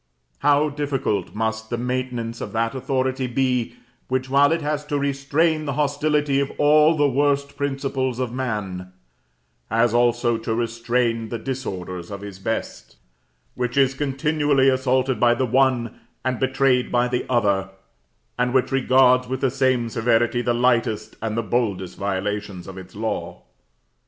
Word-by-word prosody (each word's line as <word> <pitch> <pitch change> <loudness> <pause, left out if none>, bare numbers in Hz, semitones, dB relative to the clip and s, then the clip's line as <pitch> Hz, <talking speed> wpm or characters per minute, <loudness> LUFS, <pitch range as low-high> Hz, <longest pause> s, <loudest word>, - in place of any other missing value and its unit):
How 145 +1 +3
difficult 140 -11 -2
must 110 0 -2
the 120 - -2
maintenance 125 -2 -3
of - - -6
that 115 0 0
authority 130 0 -1
be, 125 -1 0 0.3
which, 130 0 -2
while 140 +1 +5
it 165 -1 0
has 150 0 -1
to 145 -1 -1
restrain 140 +3 0
the 140 - -2
hostility 145 -1 +1
of 140 0 -1
all 150 +2 +5
the 145 -1 +4
worst 140 +1 +1
principles 135 -2 -2
of 125 -2 -3
man, 100 -8 -4 0.8
has 115 +1 +2
also 120 -1 +2
to 110 0 -2
restrain 115 0 -1
the 115 - -3
disorders 95 -10 -5
of 100 -1 -7
his 100 -2 -9
best 110 - -4 0.6
which 125 +1 -3
is 135 -1 +4
continually 145 0 +1
assaulted 130 -1 +1
by 120 0 +4
the 130 - 0
one, 125 -2 +1 0.3
and 130 -2 -1
betrayed 130 -1 +2
by 120 0 +2
the 125 0 -1
other, 100 -6 +1 0.7
and 125 +1 +1
which 130 - +2
regards 130 -1 +4
with 130 0 -3
the 135 - +2
same 130 -3 +1
severity 115 +1 +1
the 120 - 0
lightest 120 -2 +1
and 110 0 -2
the 115 - 0
boldest 100 -6 -1
violations 100 -1 -3
of 95 - -8
its 95 0 -11
law! 110 +2 -4
125 Hz, 150 wpm, -22 LUFS, 115-135 Hz, 0.8 s, while